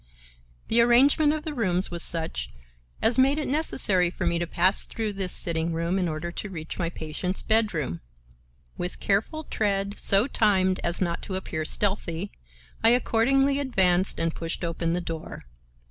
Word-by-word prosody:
The 230 +1 +4
arrangement 275 +6 +4
of 305 0 -3
the 310 -2 -5
rooms 185 -8 +1
was 170 -1 -1
such 160 - +1 0.5
as 240 +3 +3
made 270 +3 +4
it 305 - -2
necessary 210 - +2
for 175 - -5
me 170 - 0
to 175 - -2
pass 185 +4 +4
through 220 -2 -4
this 190 -2 -2
sitting 165 0 -1
room 170 +3 -1
in 180 - 0
order 160 +2 -4
to 210 - -6
reach 160 -3 -7
my 170 -2 -1
patient's 170 +3 -4
bedroom. 195 - 0 0.8
With 180 - -4
careful 220 +11 -1
tread, 200 -5 -2
so 200 +3 +3
timed 190 -7 +1
as 170 +2 -1
not 170 -2 -1
to 190 - -5
appear 160 -4 -4
stealthy, 195 -1 -1 0.5
I 225 - +6
accordingly 270 +4 +2
advanced 190 -9 +1
and 165 0 0
pushed 165 +1 -5
open 165 0 -2
the 180 - -1
door. 165 -2 -7
190 Hz, 165 wpm, -25 LUFS, 170-225 Hz, 0.8 s, I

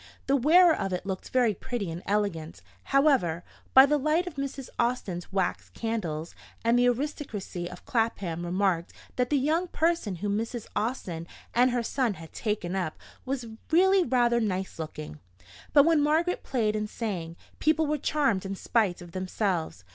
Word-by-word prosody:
The 275 - +3
wearer 325 +6 +6
of 195 - -3
it 180 - -3
looked 190 -1 -4
very 245 -4 +3
pretty 220 -4 -4
and 165 +2 -6
elegant, 200 -6 -1 0.2
however, 265 - +3 0.3
by 265 +1 +11
the 295 +1 +2
light 310 +5 +2
of 355 - -6
Mrs. 275 -2 -5
Austin's 235 -8 -1
wax 190 -2 -1
candles; 175 -9 -3 0.3
and 230 +1 +4
the 245 - +4
aristocracy 235 - -4
of 180 0 -11
Clapham 200 -8 -1
remarked 175 -1 0 0.2
that 250 -1 0
the 295 - +3
"young 315 +7 +1
person" 330 - 0
whom 200 +3 -2
Mrs. 230 0 -4
Austin 200 -7 -2 0.3
and 250 +2 +5
her 245 -1 0
son 240 -3 0
had 165 -1 -12
"taken 210 -5 -2
up" 180 -5 -2 0.3
was 260 -2 -2 0.2
really 375 +3 +5
rather 240 -3 +2
nice 190 -5 -2
looking. 75 - -6 0.5
But 285 -2 +7
when 325 -2 +4
Margaret 320 +5 +1
played 220 -5 0
and 210 0 -2
sang, 180 -9 -4 0.2
people 315 +1 +3
were 300 0 -1
charmed 270 -10 +1
in 195 0 -4
spite 195 -4 0
of 175 - -12
themselves. 185 - -2
225 Hz, 165 wpm, -28 LUFS, 185-275 Hz, 0.5 s, by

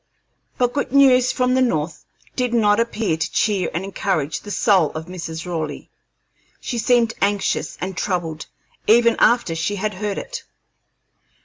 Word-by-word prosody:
But 245 -1 +1
good 285 - -2
news 255 -2 +5
from 250 -1 +1
the 260 - +3
North 165 -10 -1 0.3
did 250 -2 0
not 210 -2 +3
appear 225 -7 0
to 160 - -2
cheer 200 -5 +1
and 175 - -3
encourage 190 -6 -2
the 205 - -11
soul 195 - +3
of 160 0 -6
Mrs. 165 -2 -6
Raleigh. 160 -4 -5 0.7
She 240 - -4
seemed 230 0 +2
anxious 200 0 0
and 185 +1 -4
troubled 165 -5 -3 0.4
even 235 +1 +5
after 235 -8 +3
she 165 +5 -2
had 210 +2 -2
heard 205 +1 -3
it. - - -6
205 Hz, 150 wpm, -21 LUFS, 170-240 Hz, 0.7 s, news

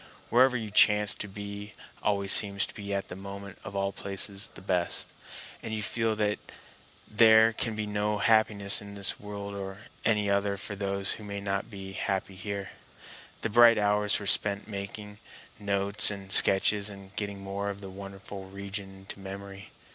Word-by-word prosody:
Wherever 125 +1 +5
you 110 -2 -5
chance 105 0 +5
to 105 - -6
be 100 +1 -8 0.3
always 100 -1 +1
seems 100 -1 +3
at 100 -2 -3
the 90 - -6
moment 100 0 -9
of 100 - -8
all 100 0 0
places 100 0 +1
the - - -8
best; 90 -2 0 0.5
and 110 -1 -4
you 105 - -2
feel 115 0 +1
that 105 -1 0 0.7
there 110 +1 +6
can 110 0 -1
be 105 0 -2
no 105 0 -1
happiness 105 -2 +5
in 100 0 -10
this 100 -1 -1
world 100 -1 -7
or 95 -1 -5
in - - -15 0.3
any 105 -2 +2
other 100 0 +1
for 100 +1 -5
those 100 -1 +1
who 110 - -8
may 100 -1 -5
not 100 +1 -2
be 95 -2 -8
happy 95 0 -2
here. 100 +1 -5 0.7
The 115 - 0
bright 120 0 +7
hours 105 0 +2
were 100 - -7
spent 100 0 +2
in 110 - -12
making 105 +1 -6 0.4
notes 100 +1 +1
and 100 -2 -7
sketches 100 +1 +3
and 100 -1 -12
getting 100 -1 -3
more 100 +1 -3
of 100 0 -6
the 95 - -8
wonderful 100 0 -9
region 100 0 -7
into 95 +1 -10
memory. 100 0 -8
100 Hz, 175 wpm, -29 LUFS, 100-105 Hz, 0.7 s, bright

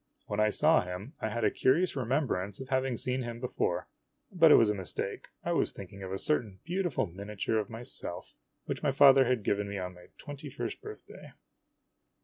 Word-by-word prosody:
When 105 - -3
I 105 0 +4
saw 155 +8 +4
him 90 - -7
I 110 - -1
had 115 +1 -3
a - - +4
curious 160 +7 +2
remembrance 120 -7 -1
of 130 -1 -8
having 130 -2 0
seen 130 +3 +2
him 120 -1 -5
before. 125 0 -1 0.4
But 165 -4 +6
it - - +10
was 110 -2 +5
a - - 0
mistake. 95 -3 -5 0.2
I - - -1
was - - +2
thinking 100 0 -10
of 95 -1 -6
a 95 - -2
certain 110 -8 -1
beautiful 175 +1 0
miniature 100 +4 -2
of 105 - -3
myself, 115 -6 -7 0.3
which - - -4
my 150 - +2
father 135 -1 +7
had 125 -3 +1
given 100 0 0
me 100 - -4
on 90 -1 -4
my 90 0 -15
twenty 145 0 -8
first - - -5
birthday. - - -11
115 Hz, 195 wpm, -30 LUFS, 100-135 Hz, 0.4 s, it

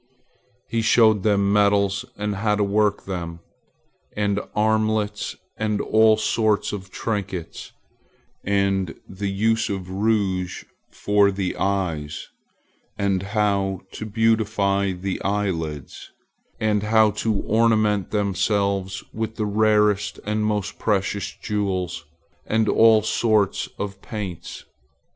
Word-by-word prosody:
He 115 0 -1
showed 110 -2 +4
them 100 -1 +2
metals 100 -2 +2
and 105 -1 -2
how 105 +1 +1
to 105 - +1
work 105 0 +1
them, 85 -3 -5 0.8
and 100 -1 +1 0.2
armlets 110 -1 0 0.2
and 105 -1 -1
all 110 0 +4
sorts 110 -1 +1
of 95 -2 -6
trinkets, 95 -5 -4 0.7
and 95 -3 0
the 100 +1 -4
use 110 +4 +1
of 95 -2 -4
rouge 95 -3 0 0.3
for 105 -1 +2
the 95 -2 -2
eyes, 85 -7 -2 0.7
and 100 -2 0
how 100 -2 0
to 110 - -6
beautify 105 -3 +1
the 95 +1 -4
eyelids, 85 -9 -3 0.5
and 105 -1 +1
how 110 0 +4
to 110 +1 -1
ornament 110 -3 +2
themselves 100 -1 0
with 110 0 -3
the 110 - -1
rarest 105 -1 +2
and 105 +1 -1
most 105 -1 -2
precious 100 -1 0
jewels 95 -6 -3 0.4
and 110 0 +1
all 110 0 +5
sorts 110 -3 +1
of 100 -1 -5
paints. 100 -6 -7
100 Hz, 110 wpm, -23 LUFS, 95-110 Hz, 0.8 s, all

